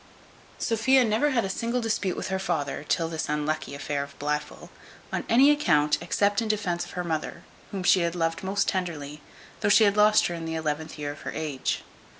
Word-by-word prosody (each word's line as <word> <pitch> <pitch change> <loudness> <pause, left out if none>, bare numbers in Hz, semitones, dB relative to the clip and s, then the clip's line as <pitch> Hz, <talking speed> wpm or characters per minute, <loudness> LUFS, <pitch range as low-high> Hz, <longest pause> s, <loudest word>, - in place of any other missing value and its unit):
Sophia 250 +4 +3
never 225 +7 +2
had 240 -6 +1
a - - -1
single 230 +5 -1
dispute 215 -5 -1
with - - -4
her 190 0 -1
father, 145 -6 -2
till 165 -2 +1
this 160 -2 -4
unlucky 150 -1 -2
affair 145 0 -2
of 140 0 -8
Blifil, 150 +1 -4 0.4
on - - -1
any 265 +5 +6
account, 150 - +2
except 200 +4 +1
in 225 - -2
defence 185 -5 -1
of - - -10
her 180 - -1
mother, 160 -3 -3 0.3
whom 195 -2 -4
she 185 - +5
had 170 0 -1
loved 165 -1 -1
most 195 +1 0
tenderly, 155 -6 -3 0.4
though - - +1
she 215 +1 +6
lost 210 +1 +4
her 175 - -1
in 165 -1 -5
the 160 0 -3
eleventh 155 0 -3
year 145 -1 -3
of 145 - -11
her - - -5
age. 150 -4 -2
175 Hz, 200 wpm, -26 LUFS, 150-210 Hz, 0.4 s, any